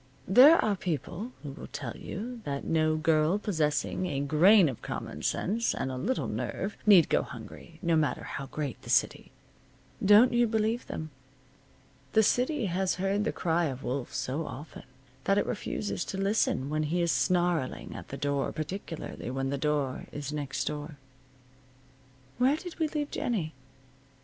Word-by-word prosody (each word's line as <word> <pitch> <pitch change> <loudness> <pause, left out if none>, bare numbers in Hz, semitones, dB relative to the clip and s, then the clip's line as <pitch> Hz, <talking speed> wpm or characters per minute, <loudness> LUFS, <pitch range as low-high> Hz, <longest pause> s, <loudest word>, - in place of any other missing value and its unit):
There 265 - +8
are 210 -2 +2
people 180 - -4
who 145 - -5
will - - -9
tell 135 -3 -6
you 235 +5 -6
that 140 -1 -3
no 155 -1 +2
girl 155 +3 +2
possessing 160 - 0
a 140 -4 -2
grain 165 +7 +6
of 130 -5 -5
common - - -6
sense 225 +5 0
and 130 - -2
a - - -4
little 220 - -1
nerve 200 +2 -3
need 190 -7 +8
go - - +2
hungry, 130 +6 -10
no 170 -1 +3
matter 155 -2 +1
how 140 - -5
great 145 -2 -4
the - - -11
city. - - +1 0.7
Don't 210 +5 +7
you 240 0 +4
believe 220 +2 0
them. 155 -1 -5 1.0
The 220 - +5
city 250 +4 +1
has 190 0 0
heard 195 +2 0
the - - +1
cry 170 0 0
of 135 -3 -4
wolf 130 0 -3
so 150 +5 -3
often 140 +3 -9 0.4
that 195 - +3
it - - +2
refuses 205 -3 -3
to 195 - -5
listen 195 -8 +1
when 155 0 0
he 170 +3 0
is 170 - +2
snarling 175 -7 0
at - - -8
the 140 - -6
door, 140 0 -1
particularly 160 -4 -5
when 135 +1 -2
the 140 - -1
door 145 -3 -1
is 145 0 -5
next 140 -3 -3
door. 150 0 -5 1.4
Where 260 +4 +4
did 355 0 -9
we 320 - +2
leave 295 -1 -3
Jennie? 175 -10 -2
165 Hz, 165 wpm, -29 LUFS, 145-205 Hz, 1.4 s, There